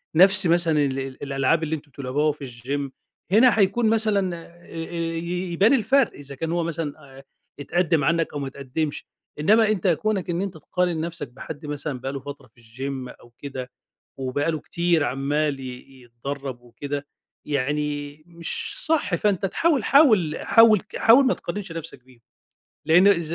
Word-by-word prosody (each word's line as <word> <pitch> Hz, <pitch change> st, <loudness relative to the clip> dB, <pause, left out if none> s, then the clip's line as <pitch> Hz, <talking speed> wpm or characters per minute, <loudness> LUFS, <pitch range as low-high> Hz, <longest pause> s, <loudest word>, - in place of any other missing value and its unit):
نَفْس 190 Hz, +2 st, +6 dB
مثلًا 165 Hz, -3 st, +3 dB
ال 135 Hz, -1 st, -2 dB
ال 135 Hz, 0 st, -7 dB
الألعاب 140 Hz, +3 st, +1 dB
اللي 160 Hz, 0 st, -1 dB
أنتم 145 Hz, -1 st, -12 dB
بتلعبوها 140 Hz, +3 st, 0 dB
في 145 Hz, -1 st, -9 dB
الgym، 135 Hz, +3 st, -4 dB, 0.4 s
هنا 230 Hz, +3 st, +5 dB
هيكون 215 Hz, +3 st, +3 dB
مثلًا 210 Hz, -5 st, +2 dB
آآ 170 Hz, +1 st, -14 dB
آآ 165 Hz, +1 st, -7 dB, 0.2 s
ي 175 Hz, +2 st, -3 dB
يبان 200 Hz, +9 st, +4 dB
الفَرْق، 265 Hz, +2 st, +3 dB
إذا 140 Hz, -1 st, -10 dB
كان 160 Hz, +4 st, -3 dB
هو 170 Hz, 0 st, 0 dB
مثلًا 150 Hz, -4 st, -5 dB
آآ 135 Hz, -, -13 dB, 0.4 s
اتقدّم 165 Hz, +1 st, +1 dB
عنّك 165 Hz, +2 st, +1 dB
أو 145 Hz, -, -3 dB
ما 140 Hz, -, -3 dB
اتقدمّش. 140 Hz, +3 st, -4 dB, 0.3 s
إنّما 215 Hz, +8 st, +4 dB
أنت 195 Hz, -3 st, -1 dB
كونك 190 Hz, +2 st, 0 dB
إن 170 Hz, +1 st, -1 dB
أنت 195 Hz, -2 st, -3 dB
تقارن 175 Hz, 0 st, -1 dB
نفسك 165 Hz, -3 st, -5 dB
بحد 145 Hz, +5 st, -9 dB
مثلًا 145 Hz, -2 st, -4 dB
بقى 135 Hz, +2 st, -4 dB
له 140 Hz, -, -4 dB
فترة 140 Hz, -1 st, -10 dB
في 120 Hz, -, -21 dB
الgym 130 Hz, +3 st, -6 dB
أو 120 Hz, -, -17 dB
كده 130 Hz, -3 st, -7 dB, 0.5 s
وبقى 135 Hz, +4 st, -1 dB
له 155 Hz, -2 st, -3 dB
كتير 170 Hz, -1 st, +1 dB
عمّال 145 Hz, +1 st, -1 dB
ي 130 Hz, 0 st, -10 dB
يتدرّب 130 Hz, +2 st, -6 dB
وكده، 140 Hz, +4 st, -6 dB, 0.4 s
يعني 145 Hz, +1 st, -2 dB
مش 170 Hz, -1 st, -4 dB
صح. 310 Hz, -, +1 dB
فأنت 195 Hz, +1 st, +1 dB
تحاول 285 Hz, -, +1 dB
حاول 215 Hz, -, +4 dB
-حاول 225 Hz, -3 st, +6 dB
ك 215 Hz, -, -11 dB
حاول 250 Hz, +4 st, +6 dB
ما 255 Hz, -, +3 dB
تقارنش 190 Hz, 0 st, -6 dB
نَفْسك 165 Hz, -6 st, -8 dB
بيهم، 130 Hz, -2 st, -21 dB, 0.7 s
لإن 180 Hz, +5 st, +6 dB
ز 160 Hz, +1 st, -4 dB
155 Hz, 170 wpm, -24 LUFS, 140-180 Hz, 0.7 s, نَفْس